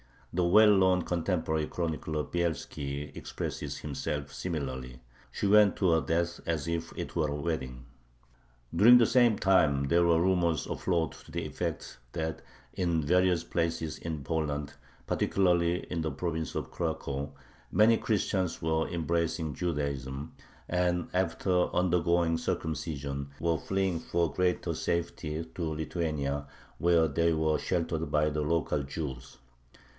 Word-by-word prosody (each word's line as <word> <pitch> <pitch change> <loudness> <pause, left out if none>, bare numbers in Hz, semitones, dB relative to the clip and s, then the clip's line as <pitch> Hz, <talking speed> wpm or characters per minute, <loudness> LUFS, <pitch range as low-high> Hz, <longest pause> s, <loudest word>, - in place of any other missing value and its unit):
The 90 0 +2
well 105 +4 +7
known 95 -2 +4
contemporary 80 -3 -1
chronicler 80 -2 -2
Bielski 75 -4 -3
expresses - - -5
himself 75 0 -4
similarly: 65 -7 -4 0.3
"She - - -3
went 105 -1 +6
to 95 -4 +2
her 80 -1 +4
death 85 +4 -1
as 80 -3 -1
if 85 0 -2
it - - -5
were 80 -3 +2
a 70 - -2
wedding." 65 -6 -3 0.9
During 120 +4 +8
the 120 - +5
same 120 -2 +4
time 70 -8 +3
there 85 +1 +4
were 85 -1 +4
rumors 85 -4 +2
afloat 85 -3 -1
to - - -14
the - - -3
effect 60 - -4
that 80 -2 -3 0.3
in 85 -4 0
various 90 +1 +3
places 80 -2 -2
in 80 -4 -5
Poland, 75 -1 -2 0.3
particularly 90 -2 +2
in 85 -2 -1
the 80 -1 -1
province 80 +2 -3
of - - -4
Cracow, 75 -4 -3 0.4
many 110 +2 +5
Christians 95 -5 0
were 80 0 0
embracing 85 -2 -1
Judaism, 70 -3 -3 0.3
and, 90 0 0
after 90 0 +1
undergoing 85 -2 +2
circumcision, 70 -3 -3
were 85 0 +1
fleeing 95 -2 -1
for 85 -1 -1
greater 90 -1 0
safety 85 -2 -2
to - - -6
Lithuania, 75 -3 -2 0.3
where 85 -1 +4
they 85 +3 +2
were 80 -1 +1
sheltered 80 -3 -1
by 75 +1 +2
the 75 0 -2
local 75 -1 0
Jews. 70 -2 -6
80 Hz, 135 wpm, -30 LUFS, 75-90 Hz, 0.9 s, During